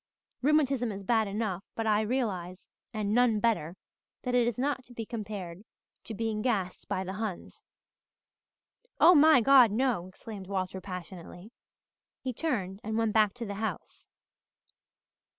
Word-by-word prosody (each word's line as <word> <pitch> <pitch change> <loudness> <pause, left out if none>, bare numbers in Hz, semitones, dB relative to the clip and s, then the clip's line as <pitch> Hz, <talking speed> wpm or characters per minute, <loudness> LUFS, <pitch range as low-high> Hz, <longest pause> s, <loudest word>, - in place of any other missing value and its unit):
Rheumatism 275 -4 +2
is 200 0 -7
bad 220 +1 +2
enough 200 -2 -3
but 225 - -2
I 215 -1 +3
realize, 200 -7 -3 0.2
and 215 -2 -2
none 240 -2 +3
better, 190 -7 0 0.5
that 250 - -2
it 245 -1 +3
is 240 - -2
not 265 0 -1
to 245 - -15
be 225 - -4
compared 205 -6 -6 0.4
to 225 - -6
being 220 0 -2
gassed 200 -7 -2
by 190 -2 -2
the 190 0 -5
Huns." 205 -3 -6 1.4
"Oh, 355 - +8
my 310 -4 +7
God, 265 -2 +7
no!" 225 -6 0
exclaimed 195 0 -10
Walter 190 -1 -3
passionately. 180 +1 -9 0.7
He 255 -1 -4
turned 210 - -2
and 220 +1 -2
went 225 -2 +1
back 215 -1 +3
to 240 -1 -5
the 200 - -5
house. 220 - -5
220 Hz, 150 wpm, -29 LUFS, 190-245 Hz, 1.4 s, Oh